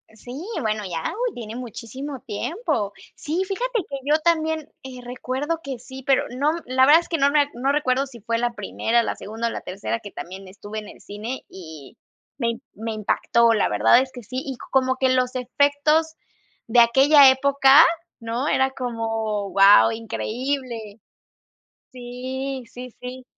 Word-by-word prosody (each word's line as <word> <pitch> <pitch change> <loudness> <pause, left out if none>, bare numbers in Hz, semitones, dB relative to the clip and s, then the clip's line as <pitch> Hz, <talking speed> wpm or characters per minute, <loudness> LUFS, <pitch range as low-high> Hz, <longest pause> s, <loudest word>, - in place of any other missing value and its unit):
Sí, 245 +7 -9 0.2
bueno, 215 -1 -1
ya, 165 -2 -3
uy, 480 0 -2
tiene 225 -2 -7
muchísimo 250 +3 -7
tiempo. 215 - -2 0.2
Sí, 330 +5 -2
fíjate 470 +1 -2
que 275 - -5
yo 295 +3 +3
también, 320 -2 +1 0.2
eh, 255 -1 -9
recuerdo 260 +6 -3
que 270 -2 -5
sí, 260 +2 -11
pero 270 0 +3
no 280 +5 +1
la 260 +1 +3
verdad 320 +3 +7
es - - -15
que 330 - 0
no 280 +1 +4
me 295 0 +4
a 285 - +2
no 265 +3 0
recuerdo 275 -2 +1
si 240 -3 -13
fue 230 +2 -2
la 240 0 -1
primera, 230 +2 0
la - - -3
segunda 225 +3 -4
o - - -2
la - - -5
tercera 200 +5 -4
que 205 -2 -10
también 190 +2 -9
estuve 205 +3 -8
en 210 - -10
el - - -14
cine, 220 +6 -6
y 160 - -12 0.4
me 235 -1 -1
me 225 +1 -5
impactó. 230 +2 +2
La 215 - +1
verdad 105 - +5
es 260 0 -5
que 245 -3 -10
sí, 255 +4 -5
y 270 -3 -6
como 260 -1 +2
que 260 0 +1
los 255 0 +1
efectos 285 +5 +1 0.5
de 235 +2 +4
aquella 270 +4 +7
época, 275 +2 +6 0.4
¿no?, 235 +4 -3
era 265 -2 +2
como, 225 -5 -3
guau, 195 +3 +7
increíble. 230 0 -4 0.9
Sí, 255 +1 -5
sí, 250 0 -9
sí. 255 +1 -8
250 Hz, 170 wpm, -23 LUFS, 225-275 Hz, 0.9 s, verdad